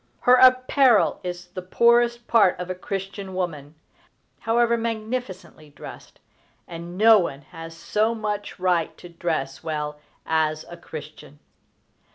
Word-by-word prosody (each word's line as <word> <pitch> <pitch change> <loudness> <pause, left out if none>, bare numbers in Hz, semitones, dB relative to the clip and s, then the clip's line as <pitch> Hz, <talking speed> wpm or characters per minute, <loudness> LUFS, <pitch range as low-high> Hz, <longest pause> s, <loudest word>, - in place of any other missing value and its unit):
Her 250 - +5
apparel 255 -1 +4
is 180 0 -6
the 185 +1 -7
poorest 235 +5 +2
part 210 -7 +3
of 180 +1 -4
a - - -1
Christian 195 +1 -6
woman, 155 -5 -4 0.6
however 235 +1 +2
magnificently 220 -8 -5
dressed, 145 - -12 0.5
and 170 +1 -8
no 220 +1 +7
one 140 -6 -4
has 165 +2 -11
so 220 +6 0
much 210 -2 -4
right 180 -3 0
to 175 - -12
dress 155 -6 -3
well 150 -2 -4 0.3
as 155 -1 0
a - - -7
Christian. 150 -3 -11
185 Hz, 130 wpm, -23 LUFS, 160-225 Hz, 0.6 s, no